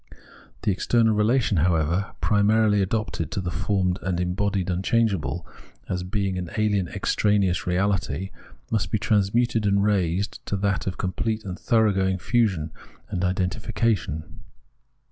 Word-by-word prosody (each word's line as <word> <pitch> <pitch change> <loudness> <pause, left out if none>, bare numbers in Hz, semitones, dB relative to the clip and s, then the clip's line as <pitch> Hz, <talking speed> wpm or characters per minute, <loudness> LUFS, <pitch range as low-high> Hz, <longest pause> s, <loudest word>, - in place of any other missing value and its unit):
The - - +2
external 110 +3 +2
relation, 105 0 +2
however, 85 +3 +1
primarily 105 0 +3
adopted 95 -5 -2
to - - -1
the 90 -2 -3
formed 95 -1 0
and 90 -1 -1
embodied 95 +1 0
imchangeable, 90 - 0 0.4
as 90 -1 -2
being 95 0 -2
an 90 - -4
ahen 105 -4 +1
extraneous 100 -4 +1
reahty, 90 -1 0 0.4
must 100 -5 0
be 110 - +1
transmuted 110 +2 +1
and 100 0 +3
raised 100 -1 0
to 100 - -1
that 100 0 -1
of 95 - -2
complete 110 +4 -2
and 95 -1 -6
thoroughgoing 95 -4 +2
fusion 95 -7 0 0.4
and 90 - -2
identifi 95 +4 -2
cation. 105 -9 0
100 Hz, 130 wpm, -24 LUFS, 90-105 Hz, 0.4 s, primarily